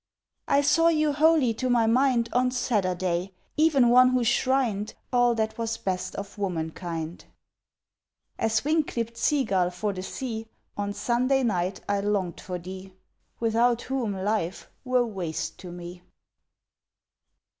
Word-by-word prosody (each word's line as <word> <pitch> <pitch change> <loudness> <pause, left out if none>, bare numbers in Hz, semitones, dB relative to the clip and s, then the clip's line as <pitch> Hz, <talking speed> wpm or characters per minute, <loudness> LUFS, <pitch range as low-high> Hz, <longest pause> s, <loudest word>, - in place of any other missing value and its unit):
I 280 - +4
saw 310 +3 +4
you 310 -3 +2
wholly 300 -5 +4
to 255 +3 -2
my 240 -2 +3
mind 245 0 +3
On 250 +1 +3
Saturday—even 195 - 0
one 250 +1 +7
who 255 -1 +1
shrined 235 -3 +1 0.2
All 245 -1 +4
that 220 0 -2
was 230 -1 -2
best 185 -1 -3
of 200 +1 -7
womankind. 165 -2 -4 1.1
As 225 +3 +1
wing 310 +1 +3
clipt 235 -4 -4
sea 285 +3 +2
gull 185 -6 +1
for 200 +3 -3
the 185 - -5
sea 225 +2 -5 0.3
On 205 0 -2
Sunday 250 +6 +1
night 185 -4 -1
I 205 0 +1
longed 200 -3 -1
for 180 -1 -5
thee, 185 +2 -9 0.4
Without 235 +1 +2
whom 255 -6 -2
life 190 -2 -2
were 250 -1 +2
waste 185 -8 -4
to 180 -2 -9
me! 175 0 -9
225 Hz, 135 wpm, -26 LUFS, 185-255 Hz, 1.1 s, one